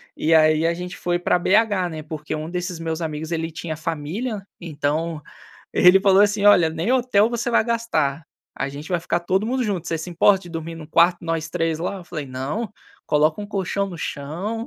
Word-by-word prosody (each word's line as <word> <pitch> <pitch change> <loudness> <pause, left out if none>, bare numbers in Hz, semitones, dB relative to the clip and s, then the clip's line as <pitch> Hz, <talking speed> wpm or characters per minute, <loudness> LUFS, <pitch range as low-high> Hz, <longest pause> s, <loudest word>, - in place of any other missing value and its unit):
E 165 - +1
aí, 155 0 +5
a 170 - +2
gente 180 +1 -7
foi 175 0 0
para 180 - +2
BH, 200 -1 +2
né, 155 -2 -7
porque 155 -1 -6
um 155 +1 -5
desses 180 0 -3
meus 165 0 -3
amigos 160 0 -4
ele 165 0 -2
tinha 160 0 -5
família, 165 - -4 0.2
então 155 0 -2 0.5
ele 180 +2 +6
falou 195 0 +5
assim: 205 0 +1
"Olha, 180 -6 +6
nem 165 +7 -2
hotel 235 -4 +3
você 235 0 -2
vai 235 - +4
gastar, 165 - -1 0.3
a 135 - -2
gente 145 +3 -8
vai 180 - +1
ficar 170 +1 -1
todo 190 +4 0
mundo 255 +2 0
junto, 195 -7 -2
você 165 - -1
se 160 +3 -6
importa 190 +3 +4
de 175 - -11
dormir 165 0 -5
num 160 -2 -9
quarto, 170 +3 +4
nós 165 -1 -2
3 165 0 -1
lá? 180 +4 -3
Eu 180 - -11
falei: 155 -5 -6
"Não, 135 - -3 0.4
coloca 155 +5 +2
um 205 - -5
colchão 200 -1 -2
no 180 - -8
chão". 175 +11 -4
170 Hz, 210 wpm, -22 LUFS, 155-200 Hz, 0.5 s, ele